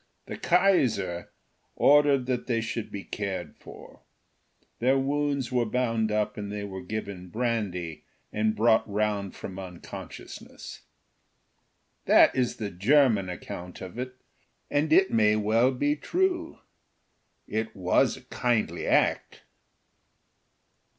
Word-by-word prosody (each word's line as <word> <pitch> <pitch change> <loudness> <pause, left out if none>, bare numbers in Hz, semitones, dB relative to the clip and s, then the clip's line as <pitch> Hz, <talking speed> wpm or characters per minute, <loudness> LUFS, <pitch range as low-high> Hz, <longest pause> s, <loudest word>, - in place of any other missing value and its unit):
The - - -6
Kaiser 130 - +2 0.5
ordered 145 -2 +4
that 125 -1 -2
they 115 -3 +1
should 115 0 -4
be 100 -1 -6
cared 95 -6 -5
for: - - -13 0.8
their 130 +3 +3
wounds 140 -1 -1
were 120 -2 +1
bound 115 -2 0
up 105 0 -1
and 100 -1 -5
they 105 0 -4
were 95 -2 -6
given 100 -1 -6
brandy, 105 -8 -3 0.3
and 110 0 +1
brought 110 0 +3
round 105 -1 -1
from 95 0 -7
unconsciousness. 90 -3 -9 1.2
That - - +6
is 125 -2 0
the 105 -2 -5
German 105 0 +3
account 90 0 -7
of 95 +5 -8
it, 125 0 -5 0.6
and 150 +2 +1
it 190 +4 +5
may 105 -1 +4
well 110 +4 +3
be 145 +3 0
true. 345 - -1 0.9
It 110 +1 -3
was 90 -2 +2
a - - -13
kindly 120 -3 -1
act. - - +1
110 Hz, 120 wpm, -27 LUFS, 100-130 Hz, 1.2 s, That